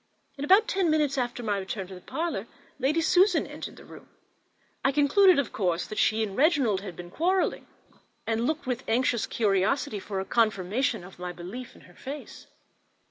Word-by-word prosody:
In 280 - -6
about 390 +8 +5
ten 380 -3 +1
minutes 300 -3 +2
after 245 -2 -2
my 205 -3 0
return 195 0 -4
to 190 - -11
the 180 - -10
parlour 315 - -3 0.3
Lady 290 +5 +2
Susan 370 +5 +4
entered - - -8
the - - -14
room. - - -14 0.7
I 270 - +3
concluded, 300 +6 +5
of 280 -4 -1
course, 180 -4 0
that 215 - -5
she 220 0 +3
and 200 -3 -4
Reginald 270 - +3
had 190 -4 -8
been 175 +1 -9
quarrelling; 365 - 0 0.6
and 225 +1 0
looked 315 -1 -2
with 250 0 -2
anxious 235 -1 +1
curiosity 210 +4 +1
for 195 0 -4
a 190 - -3
confirmation 220 0 +1
of 180 0 -13
my 180 0 -4
belief 195 +9 -8
in - - -16
her - - -18
face. 285 +3 -9
240 Hz, 185 wpm, -27 LUFS, 195-290 Hz, 0.7 s, about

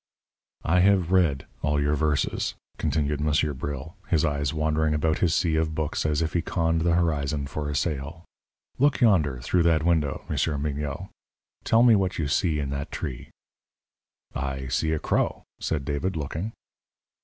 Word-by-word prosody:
"I 90 +3 +3
have 95 -2 +3
read 85 -8 +2 0.2
all 75 0 +1
your 75 +1 +1
verses," 75 -1 0 0.2
continued 75 -1 0
Monsieur 75 0 +1
Bril, 70 +3 -5
his 80 -6 +2
eyes 70 -2 0
wandering 80 0 +1
about 80 +1 +1
his 85 -3 +2
sea 80 -3 +1
of 80 -1 0
books 80 0 -1
as 75 +1 +1
if 80 - -3
he 85 - +1
conned 80 -1 0
the 85 0 +2
horizon 75 -4 0
for 75 +2 -4
a 75 - -3
sail. 75 +2 -3 0.5
"Look 145 +1 +3
yonder, 80 - +3
through 85 +7 +1
that 80 -2 +3
window, 80 -5 +1
Monsieur 75 -3 0
Mignot; 75 +4 -3 0.5
tell 115 +1 +4
me 120 -2 +7
what 95 -2 0
you 80 - -1
see 80 +1 +1
in 70 -2 -2
that 70 0 -4
tree." 65 -3 -5 1.0
"I 65 -1 -3
see 80 +6 0
a 80 - +1
crow," - - 0 0.2
said 75 -4 -2
David, 75 +7 -2
looking. 80 +7 -3
75 Hz, 165 wpm, -26 LUFS, 70-85 Hz, 1.0 s, me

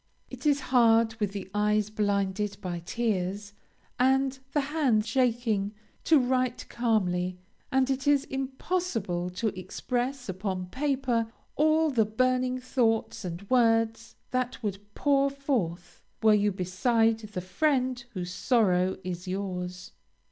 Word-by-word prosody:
It - - -4
is 285 -1 +3
hard 230 -2 +5
with 205 -2 0
the 195 -2 -6
eyes 210 0 +1
blinded 200 -1 0
by 180 -4 -4
tears, 205 0 -2 0.5
and 265 +1 +2
the 295 - +2
hand 275 -7 +1
shaking, 225 -4 0 0.3
to 320 - +6
write 255 -1 0
calmly; 185 -6 0 0.3
and 265 -1 +3
it 270 +1 -2
is 285 -1 +4
impossible 265 - -2
to 185 +5 -1
express 245 +7 -3
upon 185 -1 -3
paper 260 -5 0 0.2
all 310 +1 +3
the 225 -5 +3
burning 255 +3 +1
thoughts 230 -4 0
and 180 +2 -6
words 225 -1 +2 0.2
that 255 -1 -2
would 200 -2 -2 0.2
pour 280 -1 +3
forth, 245 - -3 0.2
were 220 -1 +7
you 205 0 +3
beside 225 +5 +1
the 215 -3 -6
friend 255 - 0
whose 180 -2 -4
sorrow 190 -6 +2
is 180 0 -5
yours. 180 -1 -4
225 Hz, 125 wpm, -28 LUFS, 195-255 Hz, 0.5 s, were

